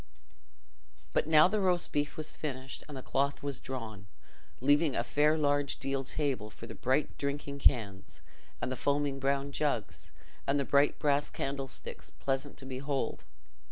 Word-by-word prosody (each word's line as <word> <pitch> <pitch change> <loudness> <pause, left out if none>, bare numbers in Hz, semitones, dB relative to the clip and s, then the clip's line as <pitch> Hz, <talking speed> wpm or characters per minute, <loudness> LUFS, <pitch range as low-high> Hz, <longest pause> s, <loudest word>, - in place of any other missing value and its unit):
But - - +2
now 155 +1 +8
the 210 +3 0
roast 180 -3 +2
beef 145 0 0
was 155 -1 -4
finished 135 -2 -5
and 145 -3 -7
the 130 - -7
cloth 140 +1 0
was 140 -2 -2
drawn, 110 -6 -6 0.5
leaving 145 +2 +4
a - - +1
fair 150 +5 +3
large 145 -2 +1
deal 135 0 -1
table 135 -5 -1
for 115 - -10
the - - -7
bright 130 +4 0
drinking 140 0 -3
cans, 100 -8 +1 0.4
and 130 - -2
the - - -1
foaming 140 +1 0
brown 140 +1 0
jugs, 145 +1 -2 0.4
and 140 +1 +3
the 140 - 0
bright 140 +2 +4
brass 145 -1 +2
candlesticks, 135 -1 -4
pleasant 135 +1 -2
to 135 - -10
behold. 135 +1 -2
140 Hz, 160 wpm, -32 LUFS, 130-145 Hz, 0.5 s, now